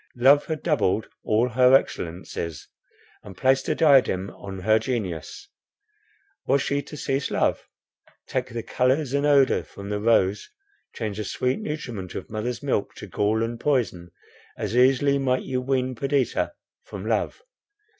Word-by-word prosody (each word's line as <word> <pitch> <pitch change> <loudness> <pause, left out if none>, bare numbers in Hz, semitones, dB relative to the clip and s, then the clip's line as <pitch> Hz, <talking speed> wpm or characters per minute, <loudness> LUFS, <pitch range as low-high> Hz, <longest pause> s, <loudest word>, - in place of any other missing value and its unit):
Love 140 +4 +5
had 155 -2 -4
doubled 130 - +1 0.2
all 115 +4 +2
her 125 +2 +5
excellencies, 85 - -2 0.5
and 95 -3 -12
placed 130 +3 +2
a - - +1
diadem 130 - +4
on 95 -1 -8
her 110 +3 +4
genius. 110 - -4 1.0
Was 140 -1 +3
she 140 0 0
to 150 - -10
cease 140 0 -1
to - - -4
love? - - 0 0.6
Take - - -2
the 115 -1 -5
colours 130 +2 +1
and 140 +1 +2
odour 140 -2 +4
from 100 0 -10
the 105 0 -1
rose, 105 -3 +2 0.5
change 105 -3 -4
the 110 - -2
sweet 125 - -1
nutriment 120 - -5
of - - -7
mother's 115 +4 -3
milk 130 -7 -1
to - - -8
gall 110 +2 0
and 115 0 -4
poison; 115 -12 0 0.5
as - - -3
easily 135 +3 +4
might 130 -1 +1
you 130 -1 -2
wean 130 0 0
Perdita 135 - 0 0.3
from - - -8
love. 455 - -1
125 Hz, 155 wpm, -24 LUFS, 105-140 Hz, 1.0 s, Love